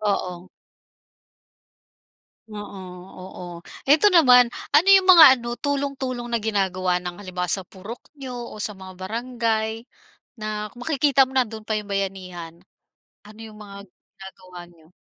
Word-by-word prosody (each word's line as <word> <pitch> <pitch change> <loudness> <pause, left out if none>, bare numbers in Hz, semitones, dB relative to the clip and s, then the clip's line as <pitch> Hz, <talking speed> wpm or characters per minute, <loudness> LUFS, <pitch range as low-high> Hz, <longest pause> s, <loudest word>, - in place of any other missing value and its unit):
Oo. 185 -4 -3 2.0
Oo, 205 -2 -8 0.4
oo. 185 -1 -9 0.4
Ito 310 +9 +5
naman, 250 -9 +6 0.2
ano 315 +6 +5
yung 385 -1 +6
mga 350 -4 +10
ano, 240 0 -5
tulong-tulong 275 -3 -3
na 235 -2 -2
ginagawa 185 -4 0
ng 180 +2 -8
halimbawa 180 -2 -4
sa 190 +2 -1
purok 200 +6 -11 0.2
niyo, 260 -2 -7 0.2
o - - -10
sa 210 0 -4
mga 190 -1 -12
barangay, 225 +1 -3 0.5
na 215 -1 -5
makikita 275 +1 +2
mo 260 - -13
nando'n 220 -4 -1
pa 215 - -2
yung 210 -1 -4
bayanihan? 185 -4 -5 0.6
Ano 210 +1 -16
yung 215 -1 -13
mga 200 -1 -11
ginagawa 185 -1 -15
niyo? 170 -1 -23
215 Hz, 130 wpm, -23 LUFS, 185-250 Hz, 2.0 s, mga